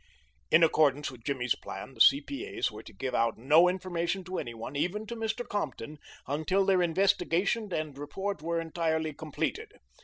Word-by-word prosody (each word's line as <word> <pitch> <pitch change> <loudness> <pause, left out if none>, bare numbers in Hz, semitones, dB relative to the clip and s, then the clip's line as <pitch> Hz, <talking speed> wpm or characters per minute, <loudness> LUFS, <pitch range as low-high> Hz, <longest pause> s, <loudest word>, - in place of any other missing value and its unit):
In 165 - +6
accordance 150 -3 +3
with 120 -3 -14
Jimmy's 125 -3 0
plan, 135 - -8
the - - -4
C.P.A.'s 285 +7 +3
were - - -9
to - - -13
give 130 -1 -4
out 115 -1 +1
no 155 +9 +5
information 180 0 -2
to 185 +1 -4
any 120 -1 -5
one, 115 +5 -7
even 190 +9 -1
to 235 - -6
Mr. 225 +2 -3
Compton, 150 - -4 0.3
until 160 +8 +1
their 190 -2 +4
investigation 190 +4 +1
and 155 -4 -3
report 150 +6 -4
were 170 +1 -1
entirely 160 -1 -1
completed. 155 0 -4
165 Hz, 165 wpm, -29 LUFS, 145-190 Hz, 0.3 s, In